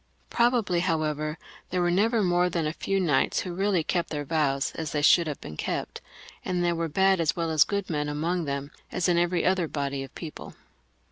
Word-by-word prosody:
Probably, 235 -7 +2
how 165 -3 +1
ever, 155 +1 -2 0.3
thete 180 - 0
were 175 0 +2
never 215 +4 +2
more 180 0 +2
than 170 -2 -1
a 155 - -1
few 195 +3 -1
knights 150 -8 +2
who 180 - -5
really 190 -2 +1
kept 175 +2 -1
their 145 -2 -3
vows 140 -3 0
as 160 -2 -5
they 145 -1 0
should 170 +2 +5
have 145 -3 -4
been 75 - -9
kept, - - -4 0.4
and 180 -1 -1
there 175 0 +2
were 165 -1 -2
bad 190 +3 +3
as 160 - +1
well 165 -1 -1
as 155 -2 +6
good 200 -2 -3
men 150 -2 -2
among 165 +4 -1
them, 140 0 -4 0.2
as 180 - 0
in 175 -1 +3
every 175 0 +1
other 185 -2 +2
body 140 -2 -3
of 135 0 -9
people. 160 -3 -8
170 Hz, 215 wpm, -27 LUFS, 150-180 Hz, 0.4 s, as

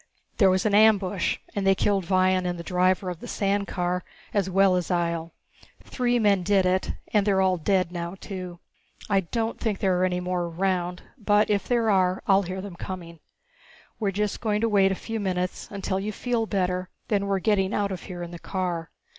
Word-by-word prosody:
There 195 -4 +6
was 185 +2 +1
an 210 - +2
ambush 205 -3 +3 0.2
and 200 -1 0
they 195 - +5
killed 195 -1 +1
Vion 185 -1 +3
and 175 -1 -2
the 170 - -6
driver 185 +1 +1
of 175 - -8
the - - -9
sand 200 0 0
car, 180 0 -1 0.3
as 195 -2 +1
well 190 0 +4
as 180 -2 -1
Ihjel. 170 -2 -1 0.5
Three 245 -1 0
men 205 -4 +3
did 190 +1 +2
it 185 +1 +1 0.2
and 210 -2 +4
they're 195 -1 +2
all 190 -1 +3
dead 185 +1 +1
now 170 0 -4
too. 185 -3 -7 0.5
I 195 - +5
don't 225 +5 -3
think 215 -4 -1
there 190 -2 +1
are - - +2
any 180 -1 +1
more 180 -1 -1
around, 180 +1 -1 0.2
but 210 0 +3
if 200 -1 0
there 235 -3 +2
are 185 -1 +2
I'll 195 0 +5
hear 185 0 -5
them 190 -3 -8
coming. 170 -3 -7 0.8
We're 210 -3 +1
just 205 +1 -2
going 210 -2 0
to 230 - +2
wait 195 -2 +4
a - - 0
few 225 -1 -3
minutes 185 -2 -2
until 195 -1 -2
you 205 +2 -3
feel 230 +1 -1
better, 185 -2 -1 0.2
then 200 -2 +1
we're 195 -1 +1
getting 195 -1 +1
out 200 -2 0
of 185 - -5
here 175 -2 -6
in 170 - -7
the 175 - -8
car." 175 -4 -3
190 Hz, 205 wpm, -25 LUFS, 180-205 Hz, 0.8 s, There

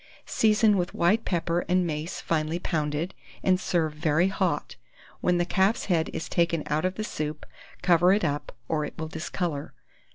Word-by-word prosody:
Season 215 -1 +3
with 180 -1 -2
white 200 +7 +2
pepper 170 -1 0
and 180 0 +3
mace 155 +1 -3
finely 160 0 0
pounded, 155 0 -2 0.3
and 185 -1 +3
serve 165 -5 0
very 155 +3 +2
hot. 185 -6 -1 0.4
When 180 0 +2
the 175 - +1
calf's 190 +6 +2
head 165 -4 +1
is - - -4
taken 170 -2 +1
out 150 +3 0
of 185 0 0
the 215 - -3
soup, 150 -6 -4 0.4
cover 175 0 +5
it 205 0 +3
up, 145 -1 -2 0.2
or 155 -2 0
it 150 - -6
will 160 -1 -4
discolour. 160 -2 -3
170 Hz, 170 wpm, -27 LUFS, 155-185 Hz, 0.4 s, cover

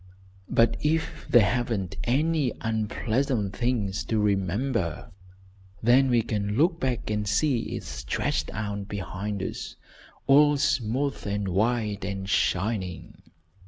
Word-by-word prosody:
But 115 0 +3
if 160 +1 -1
there 120 -5 +6
haven't 110 -4 -1
been 95 - -9
any 145 0 +1
unpleasant 110 0 -1
things 105 -6 -1
to 110 - 0
remember, 100 - 0 0.7
then 130 +4 +5
we 120 -2 +3
can 105 -1 -2
look 165 +3 +3
back 125 -6 -2
and 105 -1 -1
see 115 +4 +1
it - - -5
stretched - - -2
out 100 -1 -4
behind 100 0 -4
us, - - -5 0.5
all 145 +1 +6
smooth 135 -1 0
and 100 -1 -1
white 105 +1 0
and 95 0 -4
shining. 95 -2 -1
110 Hz, 125 wpm, -26 LUFS, 100-130 Hz, 0.7 s, there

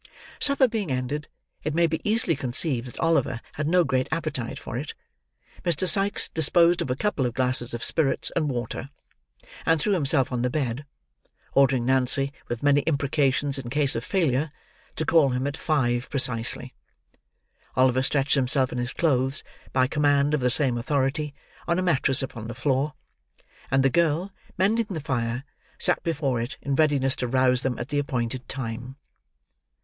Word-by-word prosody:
Supper 280 -2 +4
being 220 -7 -3
ended—it 145 +3 -5
may 170 0 +4
be 160 -1 -1
easily 210 -6 +1
conceived 130 -1 -1
that 125 - -10
Oliver 160 -7 +1
had 150 0 -3
no 180 +2 +4
great 130 -3 0
appetite 155 -7 -3
for - - -7
it—Mr. 170 - -5
Sikes 195 +4 +2
disposed 170 +2 +3
of 150 - -3
a 125 - 0
couple 145 -6 0
of 120 - -6
glasses 125 -2 +1
of 120 - -5
spirits 150 -5 +2
and 150 - +1
water, 125 +1 -4 0.7
and 165 -1 +2
threw 205 +7 +1
himself 140 -6 +1
on 125 -1 -1
the 125 - +1
bed; 135 0 -3 0.7
ordering 135 -3 +3
Nancy, 130 +2 +2
with 120 +1 -4
many 145 0 +4
imprecations 140 -2 +1
in 120 -3 -7
case 140 +1 +2
of 115 - -2
failure, 155 -5 0 0.4
to 160 - -2
call 155 -3 +4
him 125 +1 -1
at 145 0 -2
five 125 -7 0
precisely. 125 -4 0 1.0
Oliver 130 0 +3
stretched 135 +1 +1
himself 130 -1 +1
in 125 - -3
his 120 +1 -3
clothes, 135 -4 0 0.3
by 130 -1 +3
command 145 +1 +2
of 150 - +2
the 125 -1 +1
same 125 -2 +2
authority, 140 +3 -1 0.3
on 170 0 +1
a 185 - 0
mattress 135 -6 +2
upon 115 -4 -6
the 120 - -6
floor; 135 +3 0 0.7
and 135 0 +3
the 135 - +4
girl, 170 +4 +1 0.2
mending 210 +4 +2
the 180 -5 -3
fire, 130 -4 -2 0.3
sat - - +3
before 140 -7 -1
it, 120 +3 -5
in 140 - -3
readiness 140 -3 +2
to 125 - -2
rouse 130 0 +2
them 125 -2 -2
at 120 - -5
the 145 - 0
appointed 125 -3 -3
time. 125 0 -5
135 Hz, 165 wpm, -25 LUFS, 125-155 Hz, 1.0 s, Supper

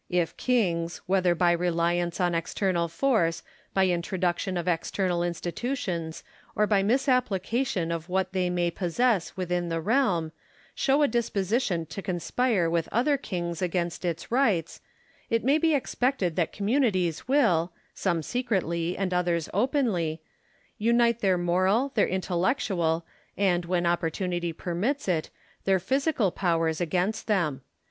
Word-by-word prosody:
If 175 -2 0
kings, 175 -9 0
whether 185 -2 +2
by 175 0 +3
reliance 170 0 0
on 175 -1 +2
external 170 +1 0
force, 170 -3 +1 0.3
by 190 -1 +4
introduction 180 +1 -1
of 175 - -3
external 180 +1 0
institutions, 175 - -3 0.3
or 210 - +3
by 205 -2 +3
misapplication 235 - +1
of 165 +1 -4
what 190 0 0
they 185 -1 +1
may 175 -1 0
possess 190 +3 0
within 180 -1 -1
the 165 0 -1
realm, 180 -5 +1 0.4
show 280 +2 +2
a - - +5
disposition 215 -6 0
to 160 +5 -7
conspire 190 +2 0
with 165 -1 0
other 270 +6 +2
kings 175 - -4
against 175 -1 -2
its 170 +2 -3
rights, 220 - +1 0.5
it 230 0 +1
may 280 +5 +3
be 320 -1 +3
expected 250 - 0
that 170 -3 0
communities 200 - 0
will 215 - +3 0.2
(some 170 -4 -1
secretly 180 - -1
and 190 -2 -1
others 175 -2 0
openly) 205 - 0 0.6
unite 235 +1 +3
their 190 -4 +2
moral, 185 +9 +2
their - - +3
intellectual, 180 -3 0 0.3
and, 180 -3 +2
when 175 0 0
opportunity 175 +1 -1
permits 190 - -2
it, 165 -4 0 0.4
tlieir 190 -1 +4
physical 260 - +1
powers 165 -3 0
against 180 +6 -1
them. 165 -11 0
180 Hz, 135 wpm, -27 LUFS, 170-225 Hz, 0.6 s, a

